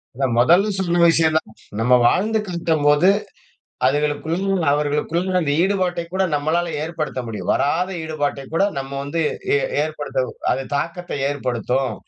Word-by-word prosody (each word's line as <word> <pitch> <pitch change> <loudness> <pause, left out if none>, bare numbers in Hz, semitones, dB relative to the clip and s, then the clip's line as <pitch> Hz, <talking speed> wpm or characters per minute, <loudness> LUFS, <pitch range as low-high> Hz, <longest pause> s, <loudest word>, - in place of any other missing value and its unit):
அதான் 130 -3 0
மொதல் 175 - +5
சொன்ன 175 -2 +1
விஷயம் 160 -1 +3
தான். 110 - -5 0.3
நம்ம 125 +2 +3
வாழ்ந்து 215 +4 +2
காட்டும் 165 -4 -1
போது, 150 +6 +5 0.8
அதுகளுக்குள்ள, 150 +4 0 0.3
அவர்களுக்குள்ள, 150 +5 0
அந்த 145 -4 -1
ஈடுபாட்டை 185 -3 0
கூட 190 0 +1
நம்மளால 165 +4 0
ஏற்படுத்த 155 -5 -4
முடியும். 110 -2 -4
வராத 175 +6 0
ஈடுபாட்டை 145 -3 -3
கூட 180 - +2 0.2
நம்ம 135 0 -6
வந்து 145 +4 -2 0.4
எ - - +3 0.2
ஏற்படுத்த 150 -4 -2 0.3
அது 135 - -2
தாக்கத்தை 170 0 -4
ஏற்படுத்தும். 125 -2 -1
155 Hz, 135 wpm, -21 LUFS, 140-175 Hz, 0.8 s, மொதல்